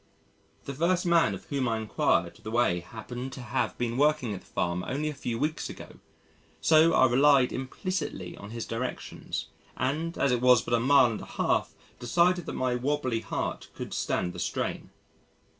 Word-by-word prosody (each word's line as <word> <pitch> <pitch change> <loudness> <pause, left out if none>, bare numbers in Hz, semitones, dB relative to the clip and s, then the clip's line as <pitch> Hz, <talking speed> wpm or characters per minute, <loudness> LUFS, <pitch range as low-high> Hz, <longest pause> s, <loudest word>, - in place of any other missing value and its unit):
The 140 - -4
first 175 +6 +1
man 170 -1 +3
of - - -11
whom 140 -3 -1
I 115 -1 0
inquired 90 -5 0
the 110 - -7
way 115 -6 +2
happened 120 +7 -7
to 130 - -7
have 120 -3 -2
been 120 0 -2
working 145 -7 +2
at 95 - -5
the - - -22
Farm 90 0 -1
only 150 +4 -1
a - - -4
few 120 -4 -4
weeks 150 +5 -2
ago, - - -10 0.6
so 160 +1 +5
I 130 - +6
relied 135 +1 +4
implicitly 130 - -4
on 100 - -10
his 115 0 -5
directions, 120 +2 -4 0.3
and 155 +6 -1
as 140 - +2
it 120 -1 +1
was 125 -3 +6
but - - -3
a 120 - +4
mile 130 0 +5
and 105 - -5
a - - -8
half - - -1 0.2
decided 175 +8 +2
that - - -4
my 130 -1 0
wobbly 130 -2 0
heart - - -4
could - - -6
stand 90 0 -1
the - - -8
strain. - - -3
125 Hz, 185 wpm, -28 LUFS, 115-150 Hz, 0.6 s, I